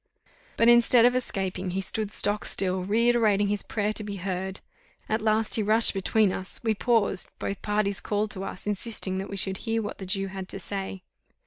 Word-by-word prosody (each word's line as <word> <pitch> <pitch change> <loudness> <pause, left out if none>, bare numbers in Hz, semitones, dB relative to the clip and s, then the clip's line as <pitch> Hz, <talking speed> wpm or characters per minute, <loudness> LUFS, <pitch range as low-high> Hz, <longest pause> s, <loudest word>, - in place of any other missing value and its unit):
But, 230 - +3
instead 240 0 +6
of 245 +1 +3
escaping, 190 -6 -3
he 185 +2 -3
stood 210 +2 0
stock 205 0 +3
still, 185 -1 0
reiterating 215 -1 +2
his 205 0 +1
prayer 210 -1 -2
to 215 - -4
be 205 -1 -6
heard: 190 0 -4 0.5
at 220 +1 -1
last 220 0 0
he 220 - +3
rushed 215 +2 +5
between 200 +1 +1
us 190 - -2
we 225 -1 +1
paused 220 -3 +1
both 200 - -5
parties 205 -2 0
called 210 0 -2
to 190 - -3
us, 185 - -6
insisting 205 -2 0
that 195 - -6
we 200 - -6
should 190 0 -1
hear 225 0 -2
what 205 - -7
the 190 - -7
Jew 195 +1 -1
had 190 -1 -8
to 195 - -4
say. 190 0 -6
205 Hz, 200 wpm, -26 LUFS, 190-220 Hz, 0.5 s, instead